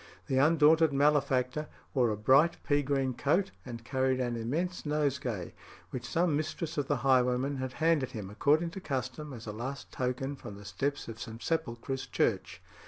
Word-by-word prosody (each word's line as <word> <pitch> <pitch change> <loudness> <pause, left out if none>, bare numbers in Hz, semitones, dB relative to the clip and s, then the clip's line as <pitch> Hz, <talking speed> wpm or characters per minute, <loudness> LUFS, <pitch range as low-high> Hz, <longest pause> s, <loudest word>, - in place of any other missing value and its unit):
The 130 - +1
undaunted 160 +1 +5
malefactor 140 0 +2 0.3
wore 125 -4 +3
a 105 - -1
bright 135 +10 +4
pea 145 -1 +2
green 135 -2 0
coat, 170 +10 +1
and 115 -2 -8
carried 130 0 +1
an 120 -2 -1
immense 160 +11 -2
nosegay, 140 - -1 0.4
which 125 - -5
some 170 -2 +2
mistress 155 +2 -3
of 140 - -1
the 145 - +2
highwayman 130 +1 +3
had 130 -1 -4
handed 160 -5 +2
him, 100 -4 -6
according 150 +10 +2
to 190 - -7
custom, 150 0 -4
as 120 -3 -8
a 105 - -4
last 130 +6 -6
token, 130 +2 -2
from 105 - -9
the 100 +1 -12
steps 140 +7 -2
of 115 -1 -8
St. 115 0 -7
Sepulchre's 135 -4 -2
Church. - - -1
135 Hz, 170 wpm, -31 LUFS, 125-150 Hz, 0.4 s, undaunted